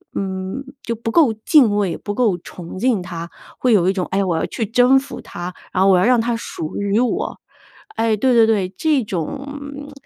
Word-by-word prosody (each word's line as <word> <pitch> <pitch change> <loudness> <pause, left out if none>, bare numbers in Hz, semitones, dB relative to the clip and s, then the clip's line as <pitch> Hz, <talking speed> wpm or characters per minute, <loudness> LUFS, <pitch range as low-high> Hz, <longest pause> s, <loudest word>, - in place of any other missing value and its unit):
嗯， 190 +6 -3 0.2
就 230 - -2
不 225 0 -4
够 280 -5 +4
敬 220 0 +4
畏、 200 -4 0
不 205 - -5
够 220 -7 +2
崇 175 +1 -10
敬 240 -3 +2
它， 170 -1 -6 0.3
会 250 -2 +3
有 185 -3 +4
一 - - +2
种， 185 -2 -2
哎， 195 +1 +1
我 175 -4 0
要 - - 0
去 230 - -3
征 245 +5 +4
服 275 - -9
它， 175 +1 -7 0.2
然 185 - +3
后 195 - +5
我 185 - +5
要 180 - +3
让 245 0 +4
它 235 +1 -1
属 160 -8 -6
于 200 +1 +1
我 250 - -1 0.6
哎， 225 -1 +2
对 255 +4 +2
对 230 -2 +6
对， 200 -5 +1
这 300 -5 +2
种 285 - -6
220 Hz, 220 characters per minute, -20 LUFS, 190-255 Hz, 0.6 s, 对